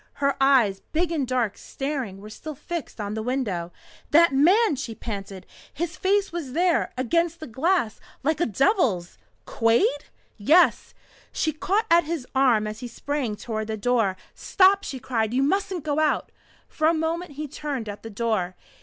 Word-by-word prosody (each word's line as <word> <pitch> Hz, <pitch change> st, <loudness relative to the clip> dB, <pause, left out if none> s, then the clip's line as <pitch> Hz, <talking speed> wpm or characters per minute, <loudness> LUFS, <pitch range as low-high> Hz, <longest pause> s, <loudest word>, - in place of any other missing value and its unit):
Her 280 Hz, -1 st, 0 dB
eyes, 245 Hz, -8 st, +4 dB
big 335 Hz, +2 st, +1 dB
and 295 Hz, -6 st, -1 dB
dark 245 Hz, -5 st, 0 dB
and -, -, -19 dB
staring, 265 Hz, -9 st, -4 dB
were 210 Hz, -, -10 dB
still 305 Hz, +6 st, -8 dB
fixed 315 Hz, -2 st, -6 dB
on 205 Hz, 0 st, -3 dB
the 220 Hz, -, -3 dB
window. 215 Hz, -9 st, -2 dB, 0.4 s
"That 330 Hz, -1 st, +5 dB
man!" 355 Hz, +7 st, +4 dB
she 255 Hz, -4 st, -5 dB
panted. 195 Hz, -4 st, -7 dB, 0.3 s
"His 340 Hz, +3 st, -4 dB
face 400 Hz, +1 st, +1 dB
was 325 Hz, -7 st, -5 dB
there 350 Hz, +2 st, +2 dB
against 335 Hz, +6 st, 0 dB
the 315 Hz, -, -7 dB
glass 265 Hz, -, 0 dB, 0.2 s
like 315 Hz, +4 st, 0 dB
a -, -, +2 dB
devil's!" 235 Hz, -, +1 dB, 0.3 s
"Quade?" 235 Hz, +5 st, +2 dB, 0.3 s
"Yes." 315 Hz, -, +4 dB, 0.4 s
She 315 Hz, -, 0 dB
caught 395 Hz, +8 st, 0 dB
at 340 Hz, -1 st, +6 dB
his 315 Hz, -5 st, -3 dB
arm 250 Hz, -5 st, +3 dB
as 215 Hz, +1 st, -5 dB
he 245 Hz, -, -6 dB
sprang 255 Hz, -2 st, -3 dB
toward 215 Hz, 0 st, -4 dB
the 220 Hz, 0 st, -3 dB
door. 220 Hz, -4 st, +1 dB, 0.2 s
"Stop!" 390 Hz, +1 st, +3 dB
she 270 Hz, -, -5 dB
cried. 230 Hz, -2 st, -1 dB
"You 265 Hz, -, +3 dB
mustn't 375 Hz, +1 st, 0 dB
go 300 Hz, -1 st, 0 dB
out 310 Hz, -1 st, +1 dB, 0.2 s
" -, -, -31 dB
For 310 Hz, -, 0 dB
a 330 Hz, -, +3 dB
moment 325 Hz, +1 st, -2 dB
he 300 Hz, +2 st, -5 dB
turned 280 Hz, -5 st, -5 dB
at 205 Hz, 0 st, -7 dB
the 225 Hz, -, -8 dB
door. 205 Hz, -4 st, -1 dB
270 Hz, 180 wpm, -25 LUFS, 220-330 Hz, 0.4 s, at